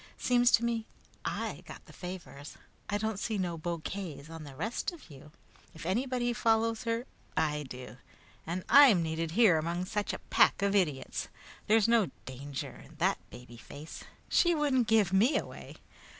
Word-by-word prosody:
Seems 245 Hz, -1 st, +3 dB
to 235 Hz, -, +5 dB
me 230 Hz, -1 st, -1 dB, 0.4 s
I -, -, -3 dB
got -, -, -10 dB
the -, -, -15 dB
favors. 180 Hz, -6 st, -8 dB, 0.3 s
I 205 Hz, -, +1 dB
didn't 220 Hz, -1 st, -2 dB
see 220 Hz, 0 st, -2 dB
no 180 Hz, -3 st, -1 dB
bouquets 165 Hz, -1 st, -5 dB
on 165 Hz, -2 st, -8 dB
the 140 Hz, -2 st, -10 dB
rest 220 Hz, -, -2 dB
of 325 Hz, -, -14 dB
you! 145 Hz, +2 st, -13 dB, 0.4 s
If 160 Hz, -, -9 dB
anybody 240 Hz, +5 st, 0 dB
follows 225 Hz, +1 st, +1 dB
her, 230 Hz, +1 st, -1 dB, 0.3 s
I 150 Hz, -2 st, 0 dB
do, 125 Hz, 0 st, -9 dB, 0.5 s
and 180 Hz, +2 st, -3 dB
I'm 260 Hz, -12 st, +7 dB
needed 160 Hz, 0 st, -2 dB
here 200 Hz, -9 st, +6 dB
among 170 Hz, +3 st, -2 dB
such 205 Hz, +2 st, -2 dB
a -, -, -4 dB
pack -, -, +4 dB
of 200 Hz, 0 st, +2 dB
idiots. 160 Hz, -9 st, 0 dB, 0.4 s
There's 220 Hz, 0 st, +4 dB
no 230 Hz, -5 st, +3 dB, 0.2 s
danger 135 Hz, +2 st, -7 dB
in -, -, -16 dB
that -, -, +1 dB
baby 125 Hz, -1 st, -12 dB
face. 145 Hz, +6 st, -10 dB, 0.2 s
She 345 Hz, -1 st, +3 dB
wouldn't 270 Hz, -6 st, +2 dB
give 215 Hz, -4 st, +3 dB
me 225 Hz, +10 st, +4 dB
away! -, -, -7 dB
190 Hz, 165 wpm, -31 LUFS, 160-230 Hz, 0.5 s, I'm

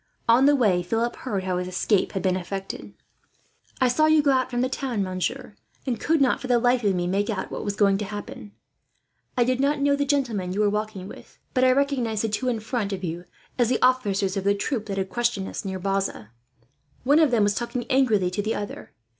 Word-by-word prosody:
On 240 Hz, +4 st, +5 dB
the 290 Hz, -, +5 dB
way, 205 Hz, -9 st, +3 dB
Philip 225 Hz, +6 st, -1 dB
heard 200 Hz, -7 st, -3 dB
how 185 Hz, -1 st, -1 dB
his 180 Hz, -, -4 dB
escape 185 Hz, +2 st, 0 dB
had 190 Hz, -, -3 dB
been 185 Hz, -1 st, +2 dB
effected. 195 Hz, +1 st, -6 dB, 0.8 s
"I 260 Hz, -, +4 dB
saw 310 Hz, +6 st, +3 dB
you 310 Hz, -1 st, +4 dB
go 285 Hz, -, +4 dB
out 260 Hz, -1 st, +1 dB
from 245 Hz, -1 st, -1 dB
the 255 Hz, -, +2 dB
town, 255 Hz, -5 st, -2 dB
monsieur; 190 Hz, +7 st, -3 dB, 0.3 s
and 250 Hz, -4 st, -2 dB
could 320 Hz, 0 st, +1 dB
not, 270 Hz, -3 st, +2 dB
for 260 Hz, -, -5 dB
the 245 Hz, -1 st, +4 dB
life 245 Hz, +1 st, +2 dB
of 200 Hz, -2 st, +2 dB
me, 175 Hz, -1 st, -1 dB
make 195 Hz, +4 st, 0 dB
out 205 Hz, -4 st, -3 dB
what -, -, -4 dB
was 205 Hz, -1 st, -3 dB
going 200 Hz, -2 st, +3 dB
to 210 Hz, -, -3 dB
happen. 205 Hz, 0 st, -8 dB, 0.9 s
I 245 Hz, -, +5 dB
did 255 Hz, +1 st, 0 dB
not 285 Hz, +2 st, +1 dB
know 280 Hz, 0 st, +3 dB
the 285 Hz, -, 0 dB
gentleman 240 Hz, -10 st, -1 dB
you 205 Hz, -, 0 dB
were 205 Hz, -1 st, +3 dB
walking 210 Hz, -3 st, -3 dB
with, -, -, -13 dB, 0.2 s
but 255 Hz, -, +2 dB
I 255 Hz, -, +6 dB
recognized 255 Hz, -6 st, 0 dB
the 225 Hz, -, 0 dB
two 235 Hz, +5 st, -2 dB
in 230 Hz, -3 st, -2 dB
front 220 Hz, -2 st, -2 dB
of 190 Hz, -1 st, -5 dB
you 175 Hz, +1 st, -4 dB, 0.3 s
as 240 Hz, -2 st, +3 dB
the 250 Hz, -, +1 dB
officers 205 Hz, -7 st, +2 dB
of 195 Hz, -, -2 dB
the 200 Hz, +1 st, +2 dB
troop 220 Hz, +1 st, -3 dB
that 195 Hz, -1 st, -4 dB
had 190 Hz, -1 st, -2 dB
questioned 235 Hz, -5 st, -1 dB
us, -, -, -6 dB
near 190 Hz, -2 st, -4 dB
Bazas. 195 Hz, -, -2 dB, 0.7 s
One 285 Hz, +5 st, +4 dB
of 315 Hz, -3 st, +5 dB
them 235 Hz, -4 st, +3 dB
was 205 Hz, 0 st, +2 dB
talking 240 Hz, +2 st, -3 dB
angrily 225 Hz, -9 st, +2 dB
to 205 Hz, -, -1 dB
the 215 Hz, +2 st, -2 dB
other. 205 Hz, 0 st, -7 dB
220 Hz, 235 wpm, -24 LUFS, 195-255 Hz, 0.9 s, I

